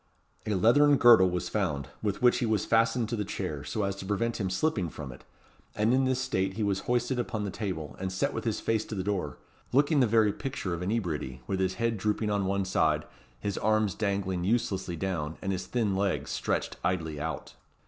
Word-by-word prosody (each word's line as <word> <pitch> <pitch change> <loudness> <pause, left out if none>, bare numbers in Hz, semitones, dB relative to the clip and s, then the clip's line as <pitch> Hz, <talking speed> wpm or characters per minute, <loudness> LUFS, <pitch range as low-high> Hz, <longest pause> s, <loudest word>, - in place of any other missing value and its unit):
A 105 - +1
leathern 140 +9 +5
girdle 115 -7 +7
was 90 0 -2
found, 75 - -1
with 105 +2 -2
which 125 - +5
he 125 - 0
was 110 -3 +1
fastened 115 +1 +2
to 120 - -1
the 105 - -1
chair, 90 -7 -4
so 110 -3 -2
as 100 0 -1
to 95 - -7
prevent 115 +4 -1
him 95 - 0
slipping 95 - 0
from 75 -3 -7
it; - - -13 0.5
and 110 +3 +2
in 130 +1 +3
this 130 0 +1
state 95 -8 -1
he 110 - -1
was 100 -2 +1
hoisted 125 +1 +1
upon 115 -3 -2
the 100 - -3
table, 80 - -4
and 95 0 -3
set 95 - 0
with - - -3
his - - -1
face 110 -1 0
to 110 - -6
the 95 - -2
door; 95 -8 -2 0.3
looking 145 +3 +3
the 125 - +4
very 110 -2 +3
picture 135 -10 -4
of 85 - -4
inebriety, 85 - -2
with 95 - -2
his 95 0 0
head 115 0 -1
drooping 105 +1 0
on 100 -2 0
one 100 0 0
side, 80 -5 +1 0.4
his 100 +3 -2
arms 110 -3 +2
dangling 100 -3 -1
uselessly 95 -4 0
down, 80 -4 -3
and 95 - -2
his 95 -1 -3
thin 110 -6 0
legs 100 0 -1
stretched - - -2
idly 80 -4 -1
out. - - -4
100 Hz, 215 wpm, -29 LUFS, 90-115 Hz, 0.5 s, girdle